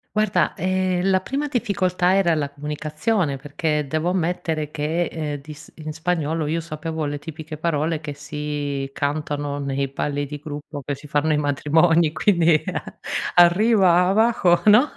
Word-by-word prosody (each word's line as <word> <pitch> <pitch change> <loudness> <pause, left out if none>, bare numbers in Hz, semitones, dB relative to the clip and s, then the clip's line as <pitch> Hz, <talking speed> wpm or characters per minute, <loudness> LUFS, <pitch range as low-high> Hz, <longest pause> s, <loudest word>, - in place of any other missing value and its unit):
Guarda, 215 -2 +2
ehm, 185 0 0
la 185 0 +3
prima 280 +7 -2
difficoltà 190 -7 +1
era 175 -4 +3
la 145 -2 -1
comunicazione 150 +3 -2
perché 150 +1 -2
devo 155 +4 0
ammettere 165 -4 -1
che, 160 +4 -1
ehm, 150 -3 -4
di 150 +1 -10
s 150 - -14
in 155 -1 -6
spagnolo 160 -1 -1
io 165 +2 -1
sapevo 160 0 -4
le 145 0 -3
tipiche 155 0 -8
parole 155 0 0
che 150 -2 -6
si 145 -1 -4
cantano 145 0 -2
nei 140 -1 -1
balli 145 +1 -3
di 150 +1 -6
gruppo, 145 -1 -7
che 145 - -2
si 145 +2 -10
fanno 145 +2 +1
ai 150 - +3
matrimoni, 155 +3 +3
quindi 170 -5 +3 0.7
arrivava 190 +3 +5
co 175 -2 +3
no, 245 +8 +6
155 Hz, 150 wpm, -22 LUFS, 145-180 Hz, 0.7 s, no